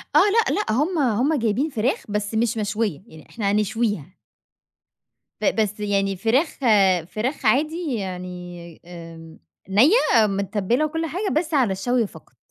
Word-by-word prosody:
آه، - - +8
لأ 435 +3 +3
لأ، 420 - -1
هُم 320 +7 0
هُم 265 +4 +1
جايبين 235 +7 0
فراخ 250 0 -1
بس 210 +1 -2
مش 230 +1 0
مشوية، 210 -5 -2
يعني 160 -5 -15
إحنا 205 -4 -2
هنشويها. 210 -4 -1 1.3
ب - - +1
بس 210 0 -2
يعني 200 -1 0
فراخ 235 - 0 0.5
فراخ 245 +6 -4
عادي 305 +5 +1
يعني، 180 -3 -7
آمم 165 -2 -11 0.3
نِيّة 250 - +4
متبَّلة 205 +7 0
وكل 325 +2 -3
حاجة، 375 +6 -3
بس 320 -1 -5
على 255 -9 +3
الشَّوي 230 +4 0
فقط. - - -17
220 Hz, 140 wpm, -22 LUFS, 195-280 Hz, 1.3 s, آه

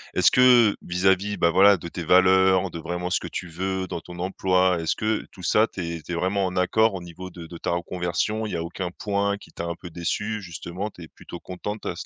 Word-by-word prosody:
est-ce - - +5
que 125 -4 +6
vis-à-vis, 95 +3 +1
bah, 85 - +3
voilà, 100 +3 +6
de 85 - -8
tes 85 - -6
valeurs, 95 +1 +4
de 85 - -6
vraiment 90 +2 -4
ce - - +1
que - - -7
tu 90 - -5
veux 95 +3 -3
dans 85 - -4
ton 90 +2 -11
emploi, 90 -1 +1
est-ce 80 - 0
que 110 0 -1
tout 90 - -13
ça 110 +5 +3
tu 95 - -7
es 85 -1 -5
tu 90 - -9
es - - -1
vraiment 95 +3 0
en 90 0 -3
accord 110 +4 +3
au 95 - -5
niveau 90 +2 -9
de 85 -2 -10
de 85 - -9
ta - - -3
reconversion? 90 +5 -2
Il 105 - -5
y - - -1
a 85 - -2
aucun 90 +2 -4
point 100 +1 -1
qui - - -16
t'a 85 - -6
un 85 0 -3
peu 90 - -10
déçue, 105 +6 -3
justement, 90 +2 -6
tu 90 - -13
es - - -10
plutôt 85 - -11
contente 105 +4 -6
à - - -3
ce - - -6
90 Hz, 255 wpm, -24 LUFS, 85-100 Hz, -, que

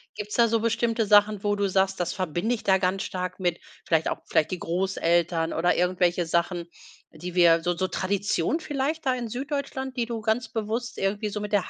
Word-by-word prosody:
gibt's 210 0 -5
da 235 -1 +5
so 225 0 +1
bestimmte 230 0 0
Sachen, 205 -1 +4
wo 205 0 +1
du 200 -1 0
sagst: 190 0 +1
„Das 175 - -1
verbinde 185 +5 -1
ich 220 - -10
da 190 -3 +4
ganz 190 +1 0
stark 185 0 -4
mit 175 -2 0 0.3
vielleicht 160 -1 +2
auch - - -3
vielleicht 155 - +2
die 185 - -3
Großeltern“ 170 -2 0
oder 175 +2 +2
irgendwelche 180 -1 +1
Sachen, 170 +1 0 0.4
die 175 +3 -8
wir 170 -2 +5
so 175 0 0
so 185 +2 -1
Tradition 200 - -1
vielleicht 295 +1 -2
da 255 - +3
in 240 -2 -4
Süddeutschland, 265 +1 -4
die 235 - +1
du 230 -1 -4
ganz 220 +2 0
bewusst 225 +2 -3
irgendwie 205 +2 -1
so 210 +1 -4
mit 210 0 -5
der 205 -3 +1
200 Hz, 205 wpm, -26 LUFS, 180-230 Hz, 0.4 s, da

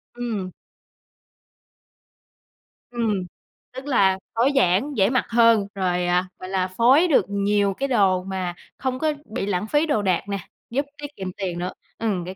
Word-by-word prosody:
Ừm. 215 -7 -3 2.4
Ừm, 235 -2 -1 0.6
tức 260 +2 -8
là 195 -8 +3 0.2
tối 250 +5 +3
giản, 260 +5 +2
dễ 195 +1 +4
mặc 255 - +1
hơn, 230 -3 +4
rồi, 180 -2 0
à, 180 +1 +2
gọi 185 - -7
là, 185 -1 0
phối 250 - +4
được 275 - +4
nhiều 200 0 +1
cái 275 +8 -2
đồ 195 -7 +3
mà 185 -2 -3 0.2
không 255 -1 -2
có 310 0 +1
bị 215 -2 -4
lãng 200 +1 -1
phí 295 +5 +2
đồ 255 -9 +1
đạc 185 -4 +1
nè, 200 - -1 0.3
giúp 275 +4 -1
tiết 295 0 -6
kiệm 190 -1 -5
tiền 180 -3 -3
nữa, 180 +1 -3 0.2
ừm, 200 -6 -1
cái 185 +1 -7
205 Hz, 165 wpm, -23 LUFS, 185-250 Hz, 2.4 s, dễ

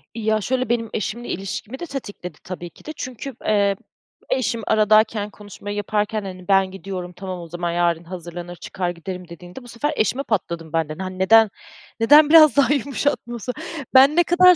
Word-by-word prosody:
Ya, 215 -1 0
şöyle 255 +2 -1
benim 230 -2 0
eşimle 230 +3 -3
ilişkimi 200 +6 -5
de 345 - -4
tetikledi 205 - -7
tabii 175 -1 -7
ki - - -21
de, 310 - -5
çünkü, 255 0 -6
eee, 200 -2 +3 0.5
eşim 240 -3 0
aradayken 215 0 +3
konuşmayı 205 0 -8
yaparken, 210 +1 -1
hani, 185 -1 -8
ben 195 -1 +3
gidiyorum 190 -2 -6
tamam 185 0 -6
o 170 - -8
zaman 175 +1 -3
yarın 170 -1 +1
hazırlanır 175 0 -8
çıkar 180 +1 -4
giderim 175 +1 -7
dediğinde, 175 +8 -11
bu 245 - -13
sefer 240 +6 -2
eşime 250 +5 0
patladım 170 - -3
ben 165 -2 0
de, 155 - -6
n - - -6
hani 185 0 -6
neden, 220 +3 +6 0.5
neden 295 +6 +7
biraz 310 -3 +8
daha 280 0 +5
yumuşatmıyorsun? 255 -3 -2 0.4
Ben 270 +3 +7
ne 345 - +5
kadar 360 +1 +6
205 Hz, 175 wpm, -22 LUFS, 180-245 Hz, 0.5 s, biraz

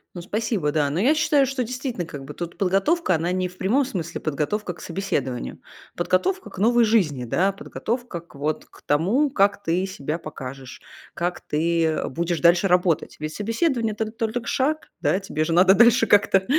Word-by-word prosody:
Ну, 175 - -5
спасибо. 205 -4 -1
Да. 145 -2 +1
Но 150 +5 -2
я 255 +10 +4
считаю, 300 -2 +3
что 265 -1 -2
действительно, 250 -5 -4
как 145 -4 -8
бы 145 - -8
тут 170 +2 -6
подготовка 195 - +2
она 165 +2 -1
не 185 0 0
в 180 0 -14
прямом 240 +10 +2
смысле 175 -8 -5
подготовка 160 +6 -2
к - - -15
собеседованию, 145 -9 -3 0.4
подготовка 365 - 0
к - - -13
новой 235 +3 +4
жизни, 175 - +2
да, 185 +11 +1
подготовка 225 -1 -4
к 170 -2 -21
вот 150 +2 -2
к - - -20
тому, 200 - +2
как 200 -4 +2
ты 180 +1 0
себя 160 -5 -4
покажешь, 135 -4 -9 0.3
как 175 +1 -3
ты, 165 +2 0
э, 160 -1 -1
будешь 170 +4 -2
дальше 175 +3 +4
работать. 180 -2 +1
Ведь 155 +1 -4
собеседование 230 - 0
это 220 +1 -2
толь 225 -1 -3
только 245 -1 -3
шаг. 305 +4 0
Да? 190 - +2
Тебе 175 -5 -2
же 165 +1 -1
надо 185 +3 +6
дальше 235 0 +5
как-то, 195 -1 +4
185 Hz, 190 wpm, -23 LUFS, 165-230 Hz, 0.4 s, надо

